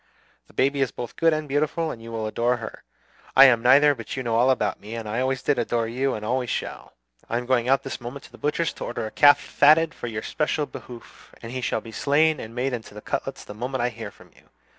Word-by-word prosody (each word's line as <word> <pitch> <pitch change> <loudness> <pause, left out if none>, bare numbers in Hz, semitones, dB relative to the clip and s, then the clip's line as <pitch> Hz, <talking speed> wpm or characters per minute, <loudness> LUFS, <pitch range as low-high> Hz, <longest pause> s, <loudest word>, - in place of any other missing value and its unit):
The - - -21
baby 140 +1 +1
is 135 - +2
both 120 0 -7
good 165 0 +3
and 155 -1 -2
beautiful, 155 +3 0
and 115 - -9
you 115 0 -9
will 110 -1 -3
adore 120 +3 0
her. 115 -1 -8 0.5
I 135 - +10
am 120 -4 +5
neither; 140 +4 +6
but 120 -1 -7
you 130 - -2
know 115 -2 -2
all 120 +3 +4
about 105 -7 0
me, 105 +3 -8
and 115 -2 -6
I 110 +3 -2
always 130 0 -1
did 140 -2 +1
adore 115 -1 0
you 130 +3 -1
and 105 - -6
always 125 +1 -1
shall. - - -5 0.4
I 115 - 0
am 125 - -4
going 125 -1 +1
out 135 0 +3
this 135 - -6
moment 125 +3 -7
to - - -16
the - - -15
butcher's 150 +3 -1
to - - -8
order 120 -1 -4
a 110 - -6
calf 145 -1 +6
fatted 160 +3 +4
for - - -7
your 110 -2 -4
special 150 -1 -1
behoof; 120 -4 -12
and 115 - -7
he 130 0 -4
shall - - -1
be 115 - -11
slain 150 +5 +2
and 115 +1 -8
made 130 +1 -1
into 110 -3 -6
cutlets - - -4
the - - -8
moment 125 +3 -3
I 120 - +1
hear 110 -2 -8
from - - -19
you. - - -24
125 Hz, 255 wpm, -24 LUFS, 115-140 Hz, 0.5 s, I